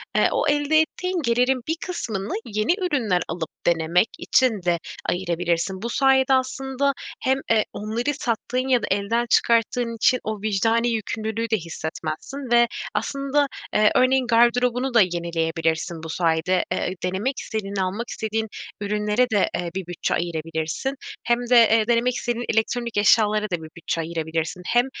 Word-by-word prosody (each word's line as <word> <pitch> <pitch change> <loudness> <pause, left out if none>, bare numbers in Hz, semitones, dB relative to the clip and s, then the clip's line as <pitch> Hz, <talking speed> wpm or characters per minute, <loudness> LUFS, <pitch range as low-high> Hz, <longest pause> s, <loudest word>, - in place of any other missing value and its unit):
eee, - - +4
o - - 0
elde 290 +1 +3
ettiğin 365 +3 -1
gelirin 250 0 +2
bir 320 - 0
kısmını 220 - -4
yeni 215 +6 +1
ürünler 230 - +1
alıp 165 -1 -4 0.2
denemek 170 +4 +3
için 245 -6 +2
de 175 -1 +2 0.3
ayırabilirsin. 175 +1 -1
Bu 235 - -3
sayede 270 +1 +3
aslında 265 +1 0 0.3
hem, 265 +1 +2
eee, 220 -2 +4
onları 230 +7 -2
sattığın 255 -1 -2
ya 250 -2 +3
da - - -1
elden 205 +5 +1
çıkarttığın 230 +1 +2
için 240 +3 +3
o 215 -2 -4
vicdani 225 +3 +1
yükümlülüğü 220 0 -2
de 220 - +2
hissetmezsin 165 - -6
ve 240 0 +6 0.3
aslında, 275 +1 0 0.3
eee, 210 0 +4
örneğin 255 0 +3
gardırobunu 245 +2 +3
da 230 - +6
yenileyebilirsin 165 -2 -1
bu 160 - -6
sayede. 165 +2 +1
Eee, 185 - -1
denemek 195 +9 -1
istediğin, 200 -3 -4
almak 195 +5 -2
istediğin 220 0 -2 0.3
ürünlere 210 +4 +1
de, 205 -4 +2
eee, 175 - -2
bir 190 -2 -4
bütçe 175 -1 -2
ayırabilirsin. 165 - -2 0.3
Hem 240 0 +2
de, 250 - +5 0.2
eee, 220 -1 +3
denemek 240 +1 +2
istediğin 240 0 -2
elektronik 235 +1 -1
eşyalara 210 0 +4
da 190 -4 -1
bir 160 -2 -9
bütçe 165 0 -2
ayırabilirsin. 165 +1 -3
Hem, 240 +1 +3
220 Hz, 150 wpm, -23 LUFS, 180-250 Hz, 0.3 s, ve